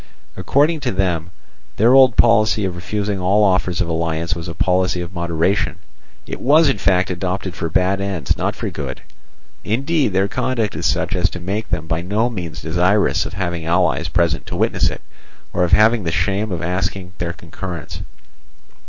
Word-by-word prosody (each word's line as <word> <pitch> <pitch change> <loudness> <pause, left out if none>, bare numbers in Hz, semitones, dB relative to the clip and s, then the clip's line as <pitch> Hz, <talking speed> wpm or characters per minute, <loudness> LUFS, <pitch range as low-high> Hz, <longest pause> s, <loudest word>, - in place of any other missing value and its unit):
According 155 +4 +2
to 130 -3 -2
them, 90 -3 -1 0.5
their 115 +4 +5
old 130 -3 +6
policy 110 -2 +4
of 90 -2 -3
refusing 100 +3 -3
all 95 +4 +3
offers 90 -2 +1
of 90 - 0
alliance 85 +1 -1
was 85 -1 -6
a 85 - -6
policy 90 +1 +1
of 90 +1 -6
moderation. 85 +2 0 0.5
It - - -6
was 150 +3 +5
in 135 - 0
fact 95 -1 +2
adopted 90 +1 -3
for 85 -1 -4
bad 95 +4 +1
ends, 95 -8 -1
not - - -2
for - - -4
good; - - -6 0.6
indeed 135 - 0
their 95 +1 +2
conduct 115 -1 -1
is - - -1
such - - 0
as - - +2
to 90 - -7
make 100 +6 -4
them 80 - -2
by 80 0 -2
no 105 +7 0
means 85 - -6
desirous 90 +5 +2
of - - -10
having 85 -4 -3
allies 85 -3 +1
present 85 -1 0
to - - -5
witness - - +1
it, - - -8 0.5
or 90 - +1
of 85 - 0
having 110 +3 +5
the 80 - -1
shame 100 +4 0
of 85 -1 -3
asking 90 +1 -3
their 85 0 -2
concurrence. 85 -1 -7
95 Hz, 180 wpm, -19 LUFS, 85-105 Hz, 0.6 s, old